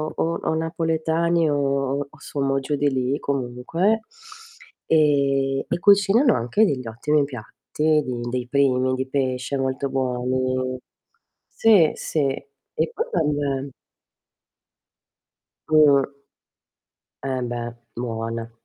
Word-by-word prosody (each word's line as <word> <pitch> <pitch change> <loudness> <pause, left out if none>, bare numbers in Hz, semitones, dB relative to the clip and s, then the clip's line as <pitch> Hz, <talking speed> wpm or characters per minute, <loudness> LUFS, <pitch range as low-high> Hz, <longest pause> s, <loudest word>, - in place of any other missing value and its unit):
o 165 +1 -1
o - - 0
napoletani 165 0 0
o 140 -1 0
o 155 - -19
sommo 135 -1 -1
giù 145 +2 -2
di 145 0 +1
lì 130 +2 0
comunque 140 - -1 0.9
e 140 -3 +2
e - - -2
cucinano 205 +6 +5
anche 125 - +2
degl'ottimi 140 - 0
piatti, 150 +4 -1
di 125 -1 -4
dei 125 0 -3
primi 130 -2 +2
di 130 +1 -3
pesce 130 0 -1
molto 135 +1 -1
buoni. 130 0 -1 0.7
Sì, 200 -9 +4
sì. 155 - -2
E 140 +4 -5
poi 460 +7 -2
vabbè 145 - -1 2.0
Mh. 150 -3 +5 1.2
Eh 130 -1 -1
beh, 120 -1 -4 0.2
buona. 115 -1 -4
140 Hz, 105 wpm, -23 LUFS, 130-155 Hz, 2.0 s, cucinano